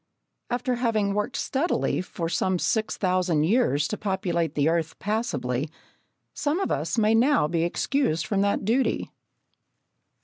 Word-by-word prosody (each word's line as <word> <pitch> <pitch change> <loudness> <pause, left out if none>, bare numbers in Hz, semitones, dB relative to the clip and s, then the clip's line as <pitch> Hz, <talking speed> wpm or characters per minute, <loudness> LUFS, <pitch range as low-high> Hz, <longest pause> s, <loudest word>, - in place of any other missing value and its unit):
After 250 0 -1
having 220 -5 +1
worked 210 0 -2
steadily 280 - 0
for 170 -2 -4
some 185 +2 0
six 220 +4 0
thousand 180 -5 +1
years 160 - +2
to 215 - -4
populate 180 -4 -1
the 145 0 +2
earth 165 -1 0
passably, 180 - -2 0.6
some 305 +4 -1
of 390 - -1
us - - -1
may 220 0 +4
now 240 - +4
be 165 +1 0
excused 170 - 0
from 200 -2 0
that 200 -1 0
duty. 245 +5 0
200 Hz, 140 wpm, -25 LUFS, 170-235 Hz, 0.6 s, may